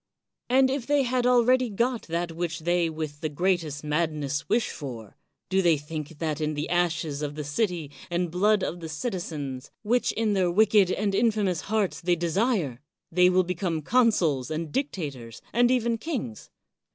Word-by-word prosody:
And 260 +1 +4
if 270 -3 -3
they 290 -1 +3
had 250 0 +1
already 250 0 +4
got 235 +3 -1
that 170 +1 -2
which 165 -1 -3
they 175 0 +1
with 155 -2 -5
the 155 - -1
greatest 160 -2 -1
madness 150 -2 -1
wish 230 0 +1
for, 120 -8 -8 0.3
do 190 +1 +2
they 170 -4 +4
think 150 +1 -7
that 155 -1 -2
in 155 0 -1
the 150 +2 -3
ashes 170 -4 0
of 145 -1 -3
the 150 - -4
city 160 0 -1 0.2
and 175 -1 -1
blood 205 +3 +3
of 175 - -3
the 165 -1 -7
citizens, 150 - -4
which 240 +3 +2
in 220 -2 +1
their 185 -3 +2
wicked 205 0 +4
and 200 0 0
infamous 205 -5 +1
hearts 210 -4 -1
they 175 0 +2
desire, 170 - 0 0.3
they 180 +2 +5
will 185 0 +4
become 175 -3 -2
consuls 180 - +2
and 160 0 -3
dictators 145 - -4
and 240 +1 +4
even 235 -2 +1
kings? 220 - -5
175 Hz, 170 wpm, -26 LUFS, 155-220 Hz, 0.3 s, they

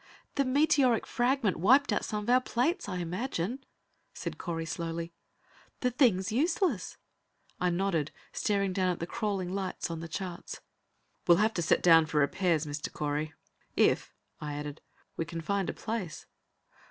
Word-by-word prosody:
"The 275 - +1
meteoric 275 -3 +3
fragment 240 -5 +1
wiped 250 - +5
out - - 0
some 210 -1 -3
of 220 - -4
our 255 +1 +6
plates, 280 - 0
I 185 - -3
imagine," 185 +6 -3 0.5
said - - -5
Correy 165 -2 -3
slowly. 165 +1 -4 0.7
"The 250 - +2
thing's 225 -8 +3
useless." 295 - 0 0.6
I 180 - +2
nodded, 175 -4 0 0.2
staring 200 -2 0
down 185 -1 +1
at 180 - 0
the 170 - -2
crawling 195 -2 -2
lights 190 -3 -3
on 165 - -4
the 165 - -6
charts. 175 +1 -5 0.7
"We'll 170 - +7
have 215 +3 +3
to 170 - -1
set 155 - +2
down 165 -2 +7
for 155 - -2
repairs, 165 +2 +2
Mr. 145 0 -4
Correy. 150 +1 -2 0.4
If," - - +3 0.3
I 150 -1 -4
added, 145 0 -6 0.4
"we - - 0
can 165 0 -5
find 195 +3 -1
a - - -2
place." 215 -8 -4
185 Hz, 160 wpm, -30 LUFS, 165-235 Hz, 0.7 s, We'll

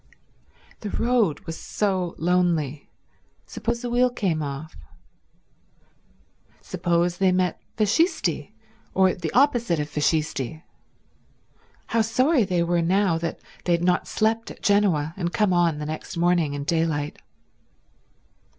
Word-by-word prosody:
The 210 - -5
road 230 -8 +1
was 165 - -7
so 190 -4 -1
lonely. 165 -5 0 0.6
Suppose 235 +1 -3
a 245 - -2
wheel 250 +1 +4
came 190 -10 -1
off. 145 +2 -6 1.8
Suppose 175 0 0
they 190 -1 +4
met 180 -2 0 0.2
Fascisti, 215 - +1 0.4
or 190 -1 +4
the 170 -3 -4
opposite 240 - +3
of 150 - -2
Fascisti. 150 -1 -1 1.2
How 230 - +1
sorry 255 +5 +3
they 180 -2 +1
were 170 0 +1
now 180 0 +2
that 165 0 -4 0.2
they 175 - +2
had 170 0 +1
not 180 0 +1
slept 225 +1 0
at - - -12
Genoa 185 -7 +2
and 175 -2 -2
come 210 -2 +2
on 170 -3 +2
the 150 - -4
next 155 +2 -6
morning 170 -4 +2
in 140 - -4
daylight. 155 -2 -1
175 Hz, 125 wpm, -24 LUFS, 160-210 Hz, 1.8 s, wheel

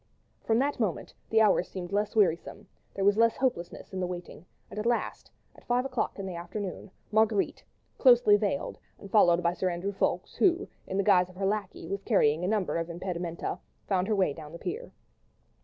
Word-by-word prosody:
From 225 - +2
that 280 +2 0
moment 210 -8 -2 0.2
the 220 0 +4
hours 200 -4 +4
seemed 180 -1 -6
less 205 +2 0
wearisome; 175 -6 +1 0.3
there 195 - 0
was 205 +1 +4
less 230 0 +4
hopelessness 220 -9 -2
in 190 - -3
the 180 - -1
waiting; 175 -1 -8 0.2
and - - -5
at 215 - -1
last, 240 - -1 0.3
at - - -17
five 245 +1 +1
o'clock 255 -3 -2
in 195 - -5
the 190 - -5
afternoon, 180 +3 -6 0.2
Marguerite, 215 -1 +2 0.4
closely 240 -5 +6
veiled 200 -8 -1 0.2
and 200 - -12
followed 175 -5 +5
by 170 0 +2
Sir 185 +1 -1
Andrew 180 +3 -3
Ffoulkes, 195 - -1
who, 370 0 +3 0.2
in 190 - -3
the 200 - +2
guise 185 -3 +4
of 185 - -15
her 195 +1 -2
lacquey, 200 -1 -2
was 195 0 -3
carrying 170 -7 +2
a - - 0
number 205 -4 0
of 165 0 -3
impedimenta, 170 -1 -4 0.3
found 190 -1 +1
her 220 - +1
way 185 -7 +2
down 150 0 -10
to - - -6
the - - -18
pier. 450 +7 -4
195 Hz, 205 wpm, -29 LUFS, 180-220 Hz, 0.4 s, closely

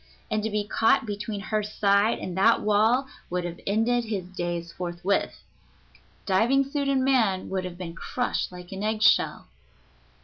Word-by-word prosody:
And 215 - +1
to 220 - -2
be 210 -1 -2
caught 225 +1 +3
between 210 0 -4
her 215 +1 -1
side 205 +1 +2
and 180 - -6
that 220 +5 +4
wall 220 +5 +3 0.2
would 180 0 -2
have 175 0 -6
ended 230 +4 +1
his 205 -5 -3
days 175 -2 -4
forthwith. 180 +2 -2 0.8
Diving 230 +8 +3
suit 280 +1 -2
and 265 -1 +2
man 225 -9 +2
would 190 -1 -2
have 180 -1 -7
been 175 -2 -6
crushed 245 +7 -2
like 180 -1 -11
an 195 0 -5
egg 215 +1 -1
shell. - - +3
205 Hz, 165 wpm, -26 LUFS, 185-225 Hz, 0.8 s, that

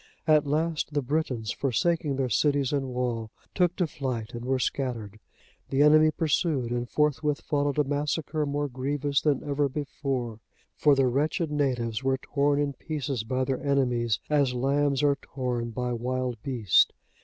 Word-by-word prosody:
At 155 -2 +4
last, 155 0 -1
the 145 - +1
Britons, 125 -6 -1
forsaking 150 +3 0
their 130 -1 0
cities 140 +1 +1
and 140 -2 0
wall, 125 -3 -2 0.2
took 180 -1 +2
to 180 - +1
flight 130 -7 -4
and 120 0 -6
were 130 +1 +1
scattered. 115 -6 -3 0.5
The 140 +1 +3
enemy 155 +1 +6
pursued, 150 -5 0
and 120 0 -2
forthwith 150 0 +1
followed 145 -1 0
a 150 - +4
massacre 150 +2 -1
more 145 +1 -1
grievous 140 +2 -1
than 145 -4 +1
ever 145 0 +1
before; 130 -5 -3 0.4
for 145 -2 +4
the 135 -1 +3
wretched 150 +5 0
natives 125 -5 -1
were 135 0 +2
torn 140 +1 +1
in 145 -1 0
pieces 140 -6 -3
by 130 +3 -1
their 130 0 -2
enemies, 125 -6 +1
as 140 -4 +2
lambs 140 +2 +1
are 140 -1 +3
torn 125 -3 -3
by 125 +2 -2
wild 125 -1 -2
beasts. 120 - +3
140 Hz, 160 wpm, -27 LUFS, 125-145 Hz, 0.5 s, enemy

